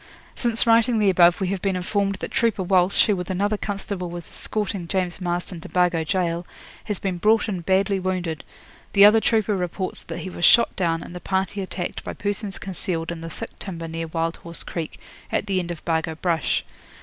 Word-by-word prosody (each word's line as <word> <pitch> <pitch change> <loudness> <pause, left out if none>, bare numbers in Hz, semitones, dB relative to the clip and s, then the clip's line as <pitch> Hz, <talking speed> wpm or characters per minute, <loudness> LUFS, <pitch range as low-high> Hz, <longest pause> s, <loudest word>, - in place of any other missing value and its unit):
'Since 235 -1 +1
writing 230 0 +4
the 205 -3 +4
above 175 -1 +5
we 190 -2 0
have 195 -2 -2
been 195 -2 0
informed 200 +2 0
that - - -6
trooper 225 -5 +1
Walsh, 185 +1 +4
who 210 - +2
with 180 -1 -5
another 200 +3 +1
constable 200 -3 -4
was 175 0 -7
escorting 200 -5 -3
James 185 0 -1
Marston 175 0 -3
to - - -9
Bargo 175 -2 +2
Gaol, 175 0 -1 0.4
has 210 -3 -2
been 185 -2 -3
brought 220 +3 +4
in 190 -5 -2
badly 190 +2 +2
wounded. 180 -4 -2 0.5
The 200 0 +8
other 215 +2 +7
trooper 220 -2 +2
reports 185 +1 -3
that - - -7
he 185 - -5
was 175 - -6
shot 235 +7 +6
down 165 -3 0
and 175 - -10
the - - -5
party 190 +2 -1
attacked 185 -2 -4
by - - -5
persons 205 -1 -3
concealed 170 -3 -3
in 165 -1 -6
the 165 - -6
thick - - -8
timber 165 -4 -5
near 165 0 -4
Wild 165 +1 -1
Horse 170 0 -5
Creek, 165 -3 -5 0.3
at - - 0
the 195 -2 +1
edge 175 -1 -4
of 170 -2 -6
Bargo 160 -1 0
Brush. 165 -2 0
185 Hz, 205 wpm, -24 LUFS, 170-200 Hz, 0.5 s, The